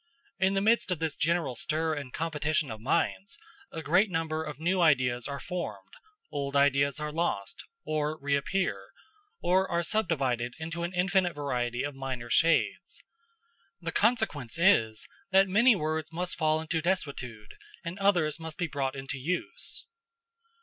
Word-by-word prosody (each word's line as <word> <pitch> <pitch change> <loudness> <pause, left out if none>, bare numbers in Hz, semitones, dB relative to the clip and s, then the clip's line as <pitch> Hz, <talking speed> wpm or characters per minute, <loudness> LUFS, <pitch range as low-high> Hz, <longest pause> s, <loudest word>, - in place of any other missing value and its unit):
In 190 +1 +3
the 195 - +2
midst 225 +1 +3
of 180 - 0
this 160 -2 -2
general 165 -5 0
stir 155 +5 0
and 140 -4 -5
competition 155 -3 -1
of 110 -1 -7
minds, 170 - 0 0.3
a 160 - -5
great 185 +8 +4
number 160 -2 -1
of 150 -2 -7
new 180 +3 +1
ideas 130 -6 +3
are 140 -1 -4
formed, 110 - -5 0.4
old 140 -1 -3
ideas 140 +1 +3
are 150 0 -3
lost, 150 - -2 0.2
or 155 0 -1
reappear, 140 +7 -1 0.5
or 190 +2 +3
are 170 0 +1
subdivided 135 - 0
into 165 +1 -5
an 170 +1 -2
infinite 180 -1 +2
variety 125 -3 -1
of 145 0 -3
minor 130 -3 -5
shades. 165 0 +2 0.8
The 165 -2 -4
consequence 210 - +1
is, 115 - +3 0.2
that 195 0 +5
many 220 +5 +5
words 155 -2 -2
must 180 +2 -3
fall 155 -1 +2
into 160 0 -1
desuetude, 140 - -3 0.3
and 170 +4 -5
others 175 -6 +2
must 160 -1 -7
be 175 - 0
brought 140 -3 -2
into 135 0 -5
use. 180 - -4
155 Hz, 150 wpm, -29 LUFS, 140-180 Hz, 0.8 s, that